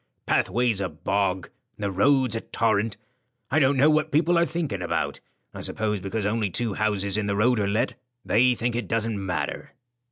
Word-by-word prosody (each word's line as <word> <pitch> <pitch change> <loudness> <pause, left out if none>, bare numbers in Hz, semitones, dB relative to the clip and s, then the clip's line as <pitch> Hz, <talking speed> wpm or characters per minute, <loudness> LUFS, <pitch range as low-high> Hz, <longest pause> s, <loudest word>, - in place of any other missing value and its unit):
Pathway's 120 -4 +1
a 95 - -1
bog, 95 +4 -1 0.3
and - - -7
the 100 - 0
road's 130 +4 +3
a 115 - -2
torrent. 110 -2 0 0.5
I 150 - +4
don't 135 -1 +3
know 145 +4 +5
what 155 0 +1
people 165 +4 +3
are 170 - +3
thinking 155 - -3
about. 90 - -2 0.3
I - - -7
suppose 105 -2 -2
because 100 +2 -3
only 105 0 0
two 115 +3 -1
houses 100 -1 0
in 105 - -2
the 100 - 0
road 115 +3 +3
are 100 - +1
let, 105 +4 0 0.3
they 125 +3 +4
think 120 0 -2
it 120 - -2
doesn't 115 -3 -1
matter." 90 -2 -4
110 Hz, 190 wpm, -25 LUFS, 100-125 Hz, 0.5 s, know